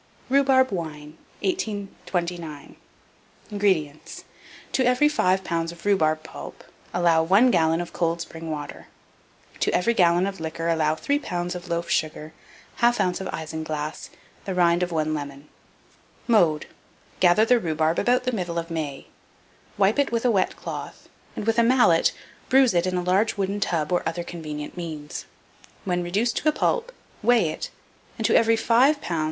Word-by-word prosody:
RHUBARB 265 -2 +4
WINE. 155 -4 -5 0.3
1829. 180 - -4 0.8
INGREDIENTS. 185 -8 -1 0.5
To 260 - +1
every 250 +4 +4
5 190 -10 +1
lbs. 165 -2 -2
of 170 +1 -14
rhubarb 155 -6 +2
pulp - - -10 0.3
allow 170 -2 +3
1 200 +10 +4
gallon 165 -2 +2
of 175 - -5
cold 170 0 0
spring 165 -1 -7
water; 150 -2 -6 0.7
to - - +1
every 205 +7 +2
gallon 175 -3 +3
of 195 -2 -4
liquor 165 +1 -3
allow 155 -2 +2
3 285 - 0
lbs. 175 -8 -3
of 180 0 -8
loaf 170 0 -2
sugar, 155 -1 -2 0.5
1/2 240 +1 +3
oz. 180 - -6
of 190 - -4
isinglass, 155 -1 -5 0.4
the 190 - -3
rind 175 -1 +3
of 180 0 -1
1 155 -1 0
lemon. 145 -1 -6 0.8
Mode. 175 -10 +3 0.5
Gather 185 +4 +5
the 245 +1 +4
rhubarb 160 -3 0
about 250 +3 +2
the 255 - 0
middle 180 -7 -3
of 165 0 -4
May; 150 -4 -4 0.7
wipe 200 +6 +3
it 285 - +2
with 230 +1 -1
a 245 - +4
wet 195 -4 +1
cloth, - - -8 0.3
and, - - -4
with 225 +1 +2
a - - +5
mallet, 230 -9 +4 0.4
bruise 265 -3 +5
it 175 +1 +2
in 185 0 -1
a 180 - -1
large 195 +5 +1
wooden 200 +1 -1
tub 165 -5 -1
or 175 - +2
other 170 +1 -4
convenient 155 -4 -7
means. 155 -4 -6 0.6
When 180 -2 0
reduced 205 +7 0
to 310 - +2
a - - +3
pulp, 475 +9 0 0.3
weigh 225 -6 +3
it, - - -5 0.5
and 225 - -2
to - - +3
every 230 0 +5
5 255 +6 +3
lbs. 170 - -3
175 Hz, 165 wpm, -24 LUFS, 160-225 Hz, 0.8 s, Gather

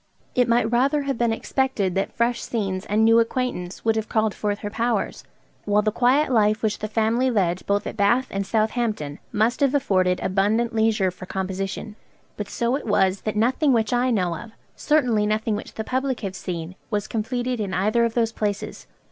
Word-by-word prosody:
It 250 -1 +3
might 235 -1 +2
rather 275 +5 +2
have 275 -3 -2
been 235 -1 +2
expected 225 -5 -1
that 195 +2 -1
fresh 235 +1 0
scenes 195 -4 -3
and 215 +2 +3
new 225 +1 +6
acquaintance 230 -7 -2
would 225 -1 +3
have 220 -1 -2
called 220 -2 +1
forth 205 -1 -2
her 205 - -3
powers; 230 -2 -1 0.4
while 210 0 +2
the 215 - +1
quiet 260 +6 +2
life 215 -1 +2
which 215 -1 0
the 215 - -3
family 225 +4 +1
led 185 -6 +1
both 200 0 +1
at - - -6
Bath 235 +6 +3
and 195 0 -1
Southampton 215 - -1
must 220 +3 +1
have 280 -1 +2
afforded 185 -9 +2
abundant 210 +5 +1
leisure 220 -4 +2
for 185 +1 -11
composition; 195 +3 -4 0.4
but 210 -1 -5
so 235 +2 0
it 280 - -5
was 195 -2 +2
that 215 - -3
nothing 255 +6 +2
which 225 -1 +1
I 245 +1 +2
know 180 -7 +1
of, 220 +6 -10 0.2
certainly 245 -9 +2
nothing 215 0 0
which 210 - -7
the 220 - -3
public 260 +2 -2
have 195 -3 -4
seen, 175 -1 -5 0.2
was 210 -2 -1
completed 245 +2 -2
in 200 -3 -2
either 210 +6 +2
of 230 -1 0
those 230 -2 +2
places. 205 -2 -4
220 Hz, 195 wpm, -23 LUFS, 200-240 Hz, 0.4 s, new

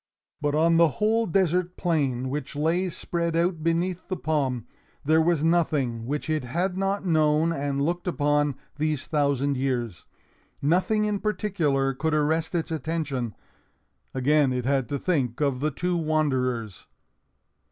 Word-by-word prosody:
But 145 0 0
on 165 +2 +4
the 170 0 +6
whole 225 +2 +2
desert 180 0 +1
plain, 135 -8 0
which 150 +2 -4
lay 165 +5 +1
spread 170 0 -2
out 170 0 +1
beneath 170 +2 -1
the 185 - -3
palm, 140 -7 -1 0.4
there 160 +2 +4
was 165 -2 +2
nothing 145 -9 +1
which 145 +3 -3
it 155 -2 0
had 175 +9 -1
not 195 +1 -1
known 155 -1 +3
and 140 -2 -2
looked 175 +5 -1
upon 145 -3 +1 0.2
these 155 -2 -1
thousand 140 -2 +1
years. 120 -8 -2 0.5
Nothing 185 +8 +2
in 210 -1 -1
particular 165 -11 0
could 155 +4 -1
arrest 160 +3 0
its 165 -1 -1
attention. 150 - -2 0.8
Again 140 +1 +2
it 125 -1 -2
had 135 -3 +1
to 145 - -1
think 135 -7 -1
of 140 -4 +1
the 150 +3 +1
two 175 +5 -2
wanderers. 130 - -1
155 Hz, 145 wpm, -26 LUFS, 140-170 Hz, 0.8 s, the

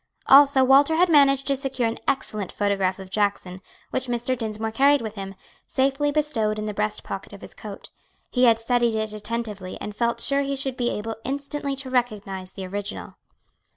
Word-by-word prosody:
Also 275 -1 +7
Walter 275 +4 +5
had 355 +2 +4
managed 275 -3 +5
to 280 - +2
secure 265 -3 -1
an 225 - -4
excellent 215 -7 -1
photograph 195 -2 0
of 190 -1 -11
Jackson, 200 -3 -1 0.3
which 260 - -1
Mr. 240 +1 -1
Dinsmore 220 -1 -3
carried 280 +5 +4
with 220 -1 -5
him, 195 -2 -7 0.3
safely 275 +2 +1
bestowed 235 -8 0
in 215 - -3
the 210 - -3
breast 210 +1 -2
pocket 195 +1 -6
of 200 - -11
his - - -11
coat. 205 -2 -10 0.4
He 250 0 +3
had 230 -2 +5
studied 235 0 +1
it 220 -1 -2
attentively 215 -3 -4
and 210 - -6
felt 235 0 0
sure 275 +4 +1
he 275 0 -2
should 270 -1 -3
be 245 -1 0
able 220 +1 -4
instantly 280 +1 -3
to 270 -1 -6
recognize 205 -7 -2
the 190 - -6
original. 200 +2 -5
235 Hz, 190 wpm, -24 LUFS, 210-270 Hz, 0.4 s, Also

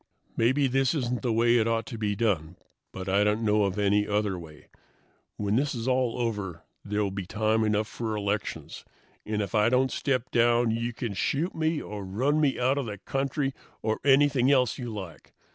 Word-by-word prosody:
"Maybe 130 +5 +2
this 135 +3 +2
isn't 125 -4 -1
the 125 - 0
way 115 +2 +4
it 110 - +1
ought 115 -1 0
to 115 - -7
be 105 -2 0
done, 90 -7 0 0.4
but 95 0 -7
I 100 +2 +3
don't 105 +2 +1
know 105 -1 +3
any 105 +1 +1
other 105 -3 0
way. 80 -3 -13 0.7
When 105 +1 0
this 140 +1 0
is 115 +1 -4
all 130 -2 +1
over 105 -8 -3 0.2
there 105 +1 -1
will 100 - -1
be 95 -2 -5
time 110 +2 +1
enough 105 0 +1
for 110 -1 -4
elections, 105 0 -3 0.4
and 105 -1 -1
if 100 - -7
I 105 +1 +4
don't 130 +1 +2
step 130 -3 -1
down 120 0 +3
you 115 +1 -1
can 115 -1 -4
shoot 145 - -1
me 160 -1 0
or 105 -1 -6
run 130 +11 0
me 140 -3 +1
out 130 +3 +2
of 135 - -3
the 105 -1 -5
country 135 +5 -2 0.3
or 110 0 0
anything 140 -1 +4
else 130 -3 +2
you 120 -2 -4
like. 95 -9 -9
115 Hz, 195 wpm, -27 LUFS, 105-130 Hz, 0.7 s, way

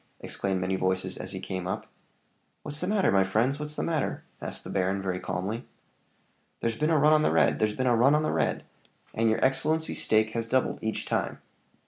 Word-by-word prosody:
exclaimed 95 -2 -2
many 90 +1 -1
voices 95 0 -1
as - - -6
he - - -5
came 95 -1 -4
up. 95 - -3 0.8
"What's 150 0 -2
the 180 - -1
matter, 205 -1 +2
my 95 -1 +4
friends? 115 +9 +1
what's 150 0 -3
the - - -2
matter?" 160 -4 -1 0.2
asked - - -6
the - - -7
baron, 95 +1 0
very 95 -2 -2
calmly. 95 +7 -3 1.0
"There's 115 -1 -1
been 150 +6 0
a 160 - +4
run 150 +2 +5
on 155 - +5
the - - +3
red! - - +3
there's 105 -1 +1
been 130 - -1
a 120 -2 +4
run 135 +6 +5
on 155 - +2
the - - 0
red! - - 0 0.5
and 115 +1 +2
your 110 - +2
excellency's 155 +5 +2
stake 110 0 +3
has 115 0 -2
doubled 130 +2 +1
each 110 0 -2
time. - - -1
115 Hz, 210 wpm, -27 LUFS, 95-150 Hz, 1.0 s, run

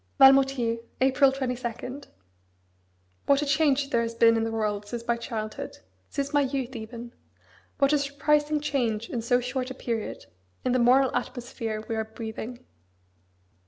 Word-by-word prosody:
VALMOUTIERS, 270 -4 +5 0.2
April 265 +1 +4
22. 250 0 -4 1.3
What 280 +1 +4
a - - -1
change 285 -1 +2
there 235 - +3
has 230 0 -3
been 230 0 +5
in 225 - +1
the 225 - -2
world 210 -2 -2
since 235 +1 -5
my 235 - +3
childhood: 220 -2 -5 0.3
since 280 +1 -3
my 290 - +4
youth 265 -2 -2
even! 235 +2 -8 0.6
what 275 +1 +3
a 295 - +4
surprising 295 +2 +1
change 235 -7 -1
in 240 - -2
so 245 +2 +2
short 255 +1 -3
a 260 - -6
period, 230 -4 -4 0.4
in 255 - +2
the 255 - +2
moral 255 +2 +4
atmosphere 235 -3 -4
we 225 - -2
are 220 - 0
breathing! 220 +2 -7
250 Hz, 155 wpm, -27 LUFS, 230-275 Hz, 1.3 s, VALMOUTIERS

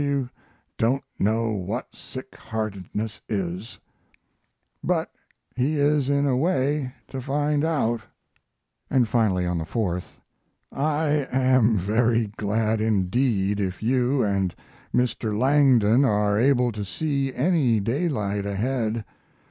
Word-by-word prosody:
W 140 -3 0 0.5
don't 125 +5 +2 0.2
know 110 +2 +1
what 105 +5 -4
sick 130 0 -10
heartedness 105 -1 -4
is 95 +1 -4 1.0
but - - 0 0.4
he 140 +5 0
is 145 -1 +2
in 140 0 +2
a 135 -3 +2
way 140 -2 +1 0.2
to 135 - -6
find 145 +3 0
out. 120 -8 0 0.9
And 130 -3 +3
finally, 105 -6 +1
on 90 -1 -1
the - - -2
4th: 90 0 -3 0.5
I 150 -1 0
am 130 -4 +3
very 115 +3 +1
glad 110 +1 0
indeed 105 0 +1
if 95 0 -3
you 130 +3 +2
and 100 -3 0 0.4
Mr. 115 -4 0
Langdon 130 -2 +4
are 105 -4 +2
able 125 +1 +3
to 105 -2 -5
see 135 - -1
any 135 -7 +2
daylight 105 - -1
ahead. 110 +1 -1
115 Hz, 115 wpm, -24 LUFS, 105-135 Hz, 1.0 s, Langdon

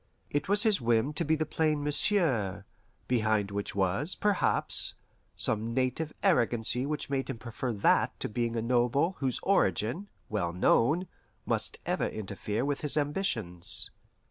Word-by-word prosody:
It 145 +4 -1
was 205 +2 +4
his 215 - +3
whim 120 +4 +1
to 150 - -1
be 160 0 +2
the 155 0 -1
plain 155 -1 0
"Monsieur"; 135 - +2 0.4
behind 110 -4 +1
which 100 0 -3
was, 100 - 0
perhaps, 205 -2 +2 0.4
some 110 +2 0
native 130 +4 0
arrogancy 120 +2 +2
which 150 -1 -3
made 135 -1 -1
him - - -4
prefer 120 +1 -4
that 100 -3 +2
to - - -2
being 115 +1 -2
a 115 - -1
noble 125 +8 +1
whose 130 -3 0
origin, 140 - +1 0.2
well 90 -6 -2
known, 140 - +2 0.4
must - - 0
ever - - 0
interfere 105 +3 -4
with 145 -1 -2
his 150 0 +1
ambitions. 120 - -2
125 Hz, 145 wpm, -29 LUFS, 110-150 Hz, 0.4 s, was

